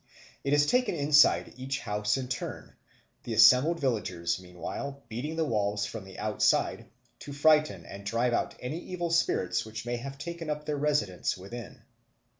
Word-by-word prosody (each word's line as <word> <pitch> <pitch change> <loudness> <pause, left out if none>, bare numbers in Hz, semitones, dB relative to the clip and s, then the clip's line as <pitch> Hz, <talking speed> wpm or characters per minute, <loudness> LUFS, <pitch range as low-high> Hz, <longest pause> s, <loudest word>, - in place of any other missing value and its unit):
It 140 - -1
is 145 0 +5
taken 250 +4 +2
inside 145 -1 +4
each 135 0 -3
house 105 -1 0
in 130 -1 -4
turn, 125 - -5 0.5
the - - -4
assembled 155 +7 +6
villagers, 90 -10 -1
meanwhile, 95 +10 -6
beating 130 +8 -4
the 160 -1 +1
walls 105 -5 0
from 110 -2 -7
the 95 - -12
outside, - - +1 0.3
to 145 - -9
frighten 150 - +3
and 100 +3 -9
drive 115 +4 0
out - - -1
any 135 +7 -4
evil 175 -1 -4
spirits 165 - +1
which 110 +1 -7
may 120 0 -2
have 135 +3 -7
taken 165 +1 -6
up 150 0 -3
their 150 -1 -2
residence 140 -15 0
within. 110 +5 -9
130 Hz, 165 wpm, -29 LUFS, 105-150 Hz, 0.5 s, assembled